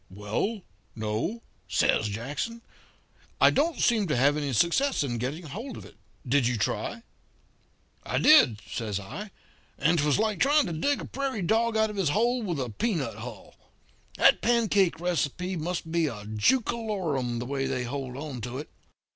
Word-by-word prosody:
"'Well, 105 - -3 0.3
no,' 110 - -3 0.2
says 110 - +2
Jackson. 145 - -4 0.8
'I - - +7
don't 310 0 +1
seem 220 -5 +3
to 150 - 0
have 140 +4 +4
any 145 -2 -2
success 170 - +2
in 120 -4 -2
getting 145 +8 -4
hold 225 - -7
of - - -10
it. - - -15 0.3
Did 130 -1 +3
you 125 -1 0
try?' 115 - -2 1.0
"'I - - -2
did,' 130 - +6
says 105 -4 -3
I, 195 - -7 0.5
'and 165 0 +2
'twas 145 0 +2
like 215 0 0
trying 290 +1 +4
to 175 - -4
dig 280 - 0
a - - -6
prairie 265 -7 -3
dog 225 +4 +2
out 220 0 +2
of 210 - -8
his 190 -6 +1
hole 240 +9 +1
with 175 -9 -2
a 125 -2 -2
peanut 140 - -2
hull. 115 -2 -9 0.6
That - - +5
pancake 215 -7 +2
receipt 175 +1 -1
must 165 0 -3
be 165 -1 +2
a 105 -6 -6
jookalorum, 165 - 0
the 120 - -4
way 135 +1 -2
they 130 -2 -1
hold 130 0 -5
on 140 -4 -6
to 125 +3 -5
it.' 150 - -7
160 Hz, 170 wpm, -27 LUFS, -, 1.0 s, I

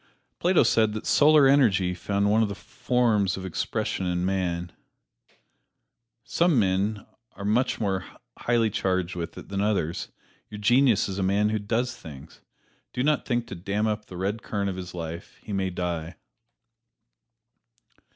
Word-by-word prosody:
Plato 180 +1 +4
said 110 -2 +3
that 110 - -5
Solar 150 -1 +6
Energy 105 -10 +3
found 100 +3 -1
one 110 +1 +4
of 110 - +1
its 100 - -7
forms 120 -7 +1
of 95 - -6
expression 95 +1 -2
in 90 0 -1
man. 90 -2 -1 1.5
Some 170 +1 +2
men 100 +1 +1 0.3
are 100 - -8
much 115 +5 +1
more 95 -4 -1 0.3
highly 115 -2 +1
charged 95 -3 -1
with 85 -1 -5
it - - -10
than 100 0 -2
others; 100 -6 -1 0.4
your 105 - -8
genius 120 +1 +3
is 95 0 -4
a - - 0
man 100 +3 +2
who 110 0 0
does 120 +4 -1
things. 75 -2 -12 0.5
Do 125 - -1
not 150 +1 +1
think 120 -2 0
to 115 - -8
dam 100 +4 -2
up 105 -1 -2
the 90 - -9
red 100 +4 -2
current 100 -2 -2
of - - -6
his 90 -1 -7
life 85 0 -7
he 105 - -6
may 95 -1 0
die. 85 -2 -4
100 Hz, 160 wpm, -26 LUFS, 95-115 Hz, 1.5 s, Solar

